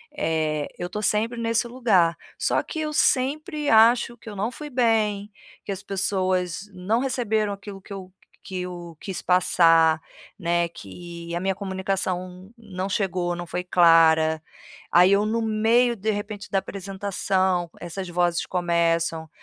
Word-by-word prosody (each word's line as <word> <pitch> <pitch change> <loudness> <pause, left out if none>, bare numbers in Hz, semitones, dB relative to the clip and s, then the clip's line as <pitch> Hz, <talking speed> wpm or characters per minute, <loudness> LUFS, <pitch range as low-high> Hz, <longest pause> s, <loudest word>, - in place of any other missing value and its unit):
eh 155 - -1
eu 175 - -4
tô 210 - -4
sempre 220 +3 0
nesse 230 +1 0
lugar, 205 -9 +2 0.2
só - - +1
que 320 - -6
eu 305 -1 -2
sempre 295 +2 +1
acho 235 +2 +5
que 225 - -11
eu 205 - -8
não 205 +3 -1
fui 295 +5 -8
bem, 220 -5 +1 0.4
que 200 - -3
as 195 +1 -8
pessoas 190 -1 -1
não 190 +5 0
receberam 220 -5 0
aquilo 200 -1 -8
que - - -17
eu 190 -2 -8 0.3
que 185 -1 -5
eu 175 -2 -7
quis 190 -2 -4
passar, 165 -3 +4 0.4
né, 170 -1 0
que 170 - -9
a - - -1
minha 190 +1 0
comunicação 190 -1 -3
não 195 -4 -5
chegou, 185 -3 -1
não 175 0 -6
foi 180 +1 -3
clara, 160 -2 +5 0.5
aí, 180 +2 +6
eu 200 +1 +3
no 225 +2 0
meio 225 +2 +2
de 215 +2 -2
repente 205 0 -5
da 195 - +1
apresentação, 190 -2 -1
essas 180 +2 -6
vozes 175 -1 0
começam: 170 -2 0
190 Hz, 150 wpm, -24 LUFS, 175-215 Hz, 0.5 s, aí